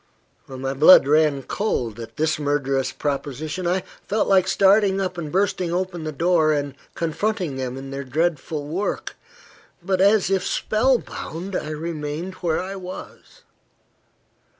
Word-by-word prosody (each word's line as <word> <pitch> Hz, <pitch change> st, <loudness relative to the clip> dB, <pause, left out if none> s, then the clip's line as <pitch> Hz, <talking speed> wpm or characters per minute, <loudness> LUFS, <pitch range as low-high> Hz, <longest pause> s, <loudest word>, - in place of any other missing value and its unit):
My 135 Hz, 0 st, -4 dB
blood 145 Hz, +1 st, +7 dB
ran 150 Hz, -2 st, +3 dB
cold 120 Hz, -, -2 dB
at 115 Hz, -, -9 dB
this 155 Hz, 0 st, +1 dB
murderous 140 Hz, -2 st, 0 dB
proposition. 150 Hz, +4 st, -3 dB
I 180 Hz, +1 st, +1 dB, 0.2 s
felt 210 Hz, +1 st, +1 dB
like 190 Hz, -2 st, +4 dB
starting 195 Hz, 0 st, +4 dB
up, 185 Hz, -1 st, -1 dB
bursting 180 Hz, +1 st, -1 dB
open 175 Hz, -2 st, -2 dB
the 155 Hz, -, -2 dB
door, 160 Hz, 0 st, +2 dB
and 145 Hz, -2 st, -2 dB, 0.2 s
confronting 175 Hz, -1 st, -1 dB
them 130 Hz, -1 st, -4 dB
in 135 Hz, 0 st, -8 dB
their 140 Hz, 0 st, -4 dB
dreadful 155 Hz, +1 st, -1 dB
work. 175 Hz, +8 st, -3 dB, 0.7 s
But, 190 Hz, 0 st, +1 dB
as 200 Hz, -1 st, +4 dB
if 190 Hz, -2 st, +2 dB
spell 245 Hz, +7 st, +2 dB
bound, 185 Hz, -3 st, -7 dB
I 150 Hz, -, -2 dB
remained 155 Hz, +2 st, -4 dB
where 170 Hz, -3 st, -1 dB
I 195 Hz, +2 st, -5 dB
was. 185 Hz, -, -10 dB
165 Hz, 140 wpm, -23 LUFS, 145-190 Hz, 0.7 s, blood